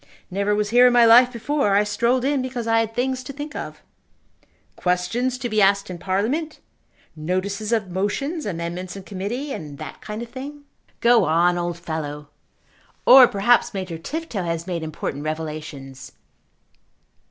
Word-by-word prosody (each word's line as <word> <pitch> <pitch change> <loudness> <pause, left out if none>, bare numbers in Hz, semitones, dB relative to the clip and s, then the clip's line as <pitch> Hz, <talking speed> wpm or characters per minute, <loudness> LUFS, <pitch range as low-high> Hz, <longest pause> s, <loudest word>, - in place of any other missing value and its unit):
"Never 200 +2 0
was 210 0 -1
here 245 +1 +7
in 245 - +3
my 240 -1 +6
life 245 +2 +7
before. 240 -3 0
I 205 - +4
strolled 235 +5 +1
in 280 -1 +1
because 250 -2 -4
I 225 0 +3
had 225 0 -2
things 255 +1 -1
to 255 - -7
think 290 +2 -7
of." - - -7 0.9
"Questions 225 +9 -1
to 250 -1 -3
be 215 -2 +1
asked 195 -1 +3
in 175 - -7
Parliament? 225 - -1 0.6
Notices 190 +7 -2
of 215 -5 0
motions, 275 - -2
Amendments 175 0 -4
in 195 - -8
Committee, 215 +10 -4
and 150 - -7
that - - -9
kind 215 +2 -6
of 235 - -10
thing?" 280 +4 -8 0.4
"Go 235 0 +5
on, 170 +3 +3
old 175 -1 -2
fellow." 150 -3 -5 0.8
"Or 255 -1 +9
perhaps 230 +3 +2
Major 185 -4 -4
Tifto 300 - -4
has 165 -1 -3
made 175 -3 -3
important 155 -2 -5
revelations." 150 -4 -6
205 Hz, 160 wpm, -22 LUFS, 175-245 Hz, 0.9 s, Or